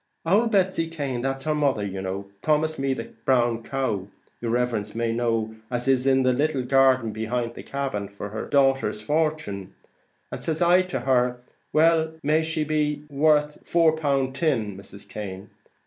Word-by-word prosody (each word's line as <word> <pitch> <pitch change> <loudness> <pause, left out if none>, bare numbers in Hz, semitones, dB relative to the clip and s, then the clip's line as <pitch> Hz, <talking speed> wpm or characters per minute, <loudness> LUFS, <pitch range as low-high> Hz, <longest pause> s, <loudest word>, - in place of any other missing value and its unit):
Ould 215 +7 +4
Betsy 185 -5 +1
Cane 140 -7 -3
that's 135 +1 -2
her 155 - 0
mother 140 -8 +1
you 95 -1 -4
know 95 +1 -4 0.2
promised 155 0 +1
me 135 -1 0
the - - -7
brown 120 -3 +2
cow, 115 -7 -2 0.3
yer 115 - -3
riverence 115 -3 -1
may 115 0 0
know, 115 -2 -1
as 120 +1 -2
is 135 0 +3
in 135 -1 +4
the 130 0 +3
little 140 0 0
garden 130 -3 +3
behint 115 +2 -2
the - - -8
cabin, 135 -8 -3
for 100 +1 -7
her 110 +2 -5
dater's 135 -6 +2
fortin; 150 - -2 0.6
and - - -5
says 160 -1 -2
I 175 +1 +5
to 185 -8 -3
her, 125 -1 +1 0.3
'Well, 160 0 +3
may 155 +2 +3
be 160 - -1
she 160 0 -1
may - - 0
be 150 -1 0
worth 150 +1 +2
four 165 -2 +3
pound 140 -4 0
tin, 130 - 0
Mrs. 100 +1 -12
Cane.' 100 -1 -7
135 Hz, 180 wpm, -25 LUFS, 115-155 Hz, 0.6 s, I